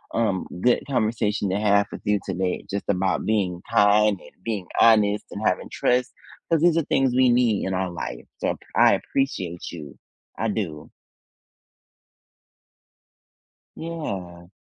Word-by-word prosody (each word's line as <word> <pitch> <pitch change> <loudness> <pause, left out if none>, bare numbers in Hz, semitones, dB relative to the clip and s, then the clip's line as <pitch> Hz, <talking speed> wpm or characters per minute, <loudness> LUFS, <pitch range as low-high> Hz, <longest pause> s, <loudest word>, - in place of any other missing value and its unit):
um, 105 -5 0
good 125 +3 +3
conversation 110 -5 0
to 95 - 0
have 100 -1 +3
with - - -8
you 105 0 +2
today, 95 -1 -2
just 100 0 -3
about 95 -1 0
being 95 -5 0
kind 105 -1 +4
and 90 - -18
being 105 -5 -3 0.2
honest 105 -2 +4
and - - -6
having - - 0
trust, 125 +1 +1 0.4
'cause 165 - +3
these 170 -1 +4
are 165 - +2
things 135 -3 +2
we 130 -1 +5
need 120 -4 +2
in 95 - -2
our 95 -1 -1
life, - - -6
so - - 0 0.2
I - - +6
appreciate 95 -11 -3
you. 75 -6 -9 0.4
I 115 - 0
do. 85 -8 -4 2.9
Yeah. 95 - -6
105 Hz, 140 wpm, -24 LUFS, 95-115 Hz, 2.9 s, I